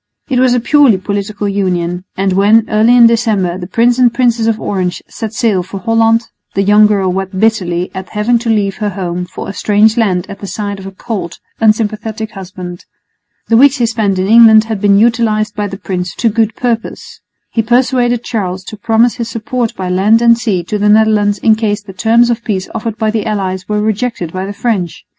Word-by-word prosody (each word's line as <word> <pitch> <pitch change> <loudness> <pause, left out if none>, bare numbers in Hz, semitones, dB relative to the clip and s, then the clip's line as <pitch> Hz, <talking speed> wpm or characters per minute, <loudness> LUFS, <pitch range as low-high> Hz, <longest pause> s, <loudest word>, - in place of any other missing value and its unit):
It 255 -3 +1
was 255 -1 +3
a - - +2
purely 265 -3 +3
political 205 +2 -4
union; 180 -3 -2
and 190 0 0
when, 210 +4 +3
early 220 +3 +4
in 235 - +7
December, 215 -6 +1
the 175 - -7
Prince 235 +5 +1
and 245 -2 +4
Princess 235 -2 +1
of 225 -1 0
Orange 185 -4 -3
set 220 -2 -6
sail 220 -5 0
for 190 +2 -8
Holland, 225 +3 +2 0.3
the 195 - +1
young 210 +1 +5
girl 195 -3 0
wept 190 0 -4
bitterly 185 -5 0
at 190 0 -7
having 225 +3 0
to 235 0 -4
leave 205 -3 0
her 210 -1 -2
home 180 -2 -4
for - - -8
a 195 - -5
strange 210 +3 +2
land 190 -6 +1
at 200 - -9
the 200 - -7
side 200 -1 -5
of 190 - -9
a - - -7
cold, 195 -4 -6 0.2
unsympathetic 220 0 -1
husband. 180 -2 -9 0.6
The 225 - +3
weeks 280 +2 +5
he 240 - +1
spent 220 -4 -1
in 185 - 0
England 220 0 +6
had 220 -3 -5
been 200 -1 +4
utilised 215 -2 +1
by 210 -1 -2
the 195 - -7
prince 180 -2 -4
to 235 - +1
good 220 0 0
purpose. 235 -2 -4 0.3
He 225 - +1
persuaded 245 0 +1
Charles 190 -6 -3
to 215 - -9
promise 225 +3 +1
his 230 -1 -4
support 230 +1 -3
by 185 -1 -4
land 200 +5 +3
and 235 0 +5
sea 215 -7 -2
to 210 +5 -3
the 210 +1 +2
Netherlands 210 -1 +3
in 220 +2 +3
case 210 -2 -2
the 195 - -11
terms 235 +4 +2
of 235 0 -3
peace 195 -5 -3
offered 220 0 -4
by 220 -2 0
the 220 0 -2
allies 190 -3 -3
were 210 0 0
rejected 215 -5 -2
by 185 +1 -4
the - - -5
French. 200 -6 -3
215 Hz, 210 wpm, -13 LUFS, 195-230 Hz, 0.6 s, in